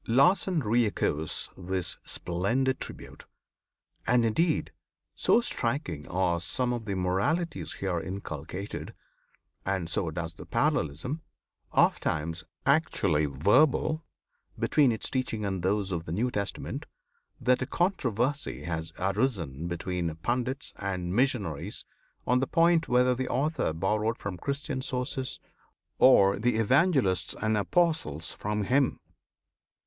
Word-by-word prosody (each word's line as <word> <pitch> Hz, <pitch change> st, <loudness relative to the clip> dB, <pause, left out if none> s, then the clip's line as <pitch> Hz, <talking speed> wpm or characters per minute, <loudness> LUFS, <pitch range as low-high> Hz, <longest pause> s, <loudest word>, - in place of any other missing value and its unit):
Lassen 170 Hz, +7 st, +4 dB
re 115 Hz, 0 st, +3 dB
echoes 80 Hz, -6 st, -1 dB
this 95 Hz, -1 st, -2 dB
splendid 115 Hz, +10 st, 0 dB
tribute; -, -, -8 dB, 0.8 s
and 125 Hz, -1 st, +4 dB
indeed, 160 Hz, +9 st, +1 dB, 0.4 s
so 240 Hz, -, +3 dB
striking 115 Hz, -, -2 dB
are 90 Hz, -1 st, +1 dB
some 125 Hz, +8 st, +1 dB
of 120 Hz, -2 st, -4 dB
the 100 Hz, -2 st, -2 dB
moralities 100 Hz, -, 0 dB
here 95 Hz, -3 st, -2 dB
inculcated, 90 Hz, +1 st, -6 dB, 0.7 s
and 95 Hz, -3 st, -1 dB
so 85 Hz, 0 st, -1 dB
close 80 Hz, +1 st, -4 dB
the -, -, -11 dB
parallelism 80 Hz, -, 0 dB, 0.5 s
ofttimes 80 Hz, +2 st, +1 dB, 0.2 s
actually 100 Hz, -, +2 dB
verbal 130 Hz, -, +3 dB, 0.5 s
between 145 Hz, -5 st, +3 dB
its 110 Hz, -, 0 dB
teachings 120 Hz, -5 st, -1 dB
and 95 Hz, -2 st, -2 dB
those 100 Hz, +1 st, 0 dB
of 85 Hz, -2 st, -3 dB
the -, -, -6 dB
New 115 Hz, +8 st, 0 dB
Testament, 100 Hz, -3 st, -4 dB, 0.5 s
that 125 Hz, +1 st, +2 dB
a 130 Hz, -, -1 dB
controversy 140 Hz, -, 0 dB
has 80 Hz, -1 st, -4 dB
arisen 95 Hz, -, -1 dB
between 85 Hz, -1 st, -2 dB
Pandits 125 Hz, -, -2 dB
and 90 Hz, -3 st, -3 dB
Missionaries 105 Hz, -, 0 dB, 0.4 s
on 125 Hz, +1 st, +3 dB
the 135 Hz, -, 0 dB
point 165 Hz, 0 st, +3 dB
whether 125 Hz, +1 st, +4 dB
the 130 Hz, +1 st, -3 dB
author 150 Hz, -, 0 dB
borrowed 105 Hz, +7 st, 0 dB
from 95 Hz, -3 st, -5 dB
Christian 140 Hz, -, -3 dB
sources, 130 Hz, 0 st, -2 dB, 0.6 s
or 100 Hz, -7 st, +6 dB
the 120 Hz, +1 st, +2 dB
Evangelists 130 Hz, -, +2 dB
and 110 Hz, 0 st, +1 dB
Apostles 105 Hz, -, +1 dB
from 105 Hz, 0 st, -2 dB
him. 130 Hz, +6 st, +2 dB
105 Hz, 120 wpm, -28 LUFS, 90-130 Hz, 0.8 s, or